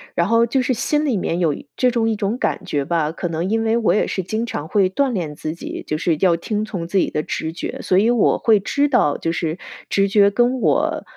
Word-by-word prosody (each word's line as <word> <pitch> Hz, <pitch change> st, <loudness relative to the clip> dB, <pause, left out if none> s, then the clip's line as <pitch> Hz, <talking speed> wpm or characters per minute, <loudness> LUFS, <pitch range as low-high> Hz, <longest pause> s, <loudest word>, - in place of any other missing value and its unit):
然 170 Hz, -, +1 dB
后 230 Hz, +2 st, +4 dB
就 255 Hz, +3 st, 0 dB
是 255 Hz, +1 st, 0 dB
心 295 Hz, +6 st, 0 dB
里 255 Hz, -7 st, +1 dB
面 175 Hz, -2 st, -2 dB
有 165 Hz, -4 st, +2 dB, 0.2 s
这 255 Hz, -, +2 dB
种 230 Hz, -2 st, 0 dB
一 220 Hz, -, 0 dB
种 210 Hz, +2 st, -2 dB
感 -, -, -2 dB
觉 145 Hz, -2 st, -2 dB
吧， 160 Hz, -1 st, 0 dB
可 175 Hz, +2 st, -4 dB
能 165 Hz, +2 st, -2 dB
因 225 Hz, +1 st, +1 dB
为 225 Hz, 0 st, +1 dB
我 230 Hz, -, +2 dB
也 210 Hz, -, +1 dB
是 190 Hz, -, -3 dB
经 220 Hz, +6 st, -2 dB
常 155 Hz, -9 st, -5 dB
会 195 Hz, -2 st, +2 dB
锻 270 Hz, +8 st, 0 dB
炼 170 Hz, -9 st, -3 dB
自 155 Hz, +1 st, -4 dB
己， -, -, -7 dB
就 155 Hz, -, -2 dB
是 165 Hz, +1 st, +1 dB
要 175 Hz, -3 st, +4 dB
听 210 Hz, +5 st, -2 dB
从 190 Hz, -6 st, -5 dB
自 195 Hz, -, -1 dB
己 -, -, +1 dB
的 150 Hz, -, -2 dB
直 160 Hz, -, -3 dB
觉， 170 Hz, -, -6 dB
所 185 Hz, -, +1 dB
以 215 Hz, +4 st, +4 dB
我 240 Hz, -4 st, +3 dB
会 225 Hz, -5 st, +3 dB
知 285 Hz, +8 st, +1 dB
道 245 Hz, -, +2 dB
就 165 Hz, -, -2 dB
是 165 Hz, 0 st, -2 dB, 0.3 s
直 195 Hz, 0 st, +2 dB
觉 200 Hz, 0 st, +4 dB
跟 245 Hz, +4 st, +1 dB
我 -, -, +1 dB
200 Hz, 275 characters per minute, -20 LUFS, 170-230 Hz, 0.3 s, 后